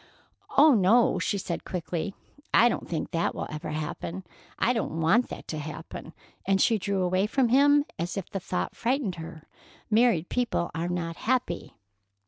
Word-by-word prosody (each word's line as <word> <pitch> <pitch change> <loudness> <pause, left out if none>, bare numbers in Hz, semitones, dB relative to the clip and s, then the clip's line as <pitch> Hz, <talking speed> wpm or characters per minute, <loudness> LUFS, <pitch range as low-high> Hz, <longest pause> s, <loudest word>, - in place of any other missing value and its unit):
"Oh, 295 +1 +8
no," 225 +3 +4
she 205 - 0
said 175 -3 -4
quickly; 180 +1 -4 0.4
"I 240 - +6
don't - - -4
think 165 - -3
that 165 0 0
will - - -3
ever 155 +2 -5
happen. 155 +4 -4 0.3
I 245 - +2
don't 215 -8 -2
want 195 +10 +3
that - - -8
to 155 - -3
happen;" 150 +1 -8 0.3
and 195 0 +2
she 225 +1 +3
drew 195 -1 -1
away 185 +3 +1
from 255 +1 +2
him 285 +3 +5
as 175 +4 -3
if 195 - -4
the 195 - -4
thought 180 0 -3
frightened 235 -7 -1
her. 160 -1 -9 0.5
"Married 215 -6 +3
people 240 -8 -1
are 170 +2 -2
not 170 -2 -3
happy." 245 -8 -1
190 Hz, 170 wpm, -27 LUFS, 170-235 Hz, 0.5 s, Oh